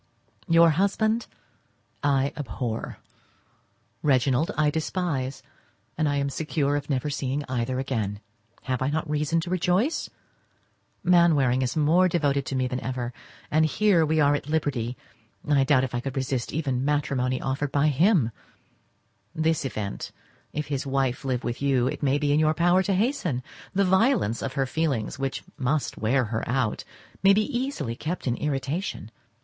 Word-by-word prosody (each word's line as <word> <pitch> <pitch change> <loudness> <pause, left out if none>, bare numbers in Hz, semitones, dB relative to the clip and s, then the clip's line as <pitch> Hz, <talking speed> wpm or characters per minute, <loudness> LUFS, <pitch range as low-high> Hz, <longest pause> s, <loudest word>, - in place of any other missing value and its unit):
Your 165 -1 +6
husband 215 +6 +1 0.7
I 140 -1 +1
abhor, 115 -3 -4 1.0
Reginald 135 +1 +2
I 150 -1 +3
despise, 150 -4 -2 0.5
and 155 0 +1
I 145 - 0
am 140 0 0
secure 150 -1 -1
of 145 0 -3
never 140 +1 -1
seeing 140 +1 -2
either 130 0 -1
again. 110 -7 -2 0.4
Have 130 -2 -2
I 130 - +1
not 155 +2 -1
reason 150 +2 0
to 175 +1 -5
rejoice? 185 - +1 0.9
Mainwaring 160 -8 +4
is 130 0 -1
more 165 +5 +4
devoted 145 -6 0
to 135 - -3
me 130 -1 +1
than 125 0 -3
ever; 125 -2 -4 0.4
and 155 0 +3
were 205 -6 +5
we 155 0 +1
at 145 -1 +2
liberty, 135 -6 -1 0.5
I 145 -2 +4
doubt 135 -1 +3
if 130 - -3
I 120 - 0
could 135 +2 -5
resist 130 -2 -2
even 135 -5 -1
matrimony 135 -3 0
offered 135 +1 -2
by 145 +1 +3
him. 150 - +3 1.0
This 160 -2 +1
event, 105 -6 -4 0.4
if 150 0 -3
his 140 -2 -2
wife 135 -1 0
live 130 -2 -1
with 120 +2 -3
you, 135 -3 +2
it 140 +3 -2
may 140 -1 +2
be 145 -1 +1
in 150 - +3
your 155 0 +3
power 175 +3 +4
to 190 +1 0
hasten. 185 - 0 0.3
The 200 0 +3
violence 190 - +2
of 135 - -3
her 135 -1 0
feelings, 135 -4 -1
which 135 -1 -3 0.2
must 140 +3 0
wear 125 +4 +2
her 115 +1 -3
out, 125 -3 0 0.4
may 195 +1 +6
be 215 +1 +2
easily 240 - -2
kept 165 +8 -4
in 120 -3 +1
irritation. 145 - -3
145 Hz, 160 wpm, -26 LUFS, 130-160 Hz, 1.0 s, Your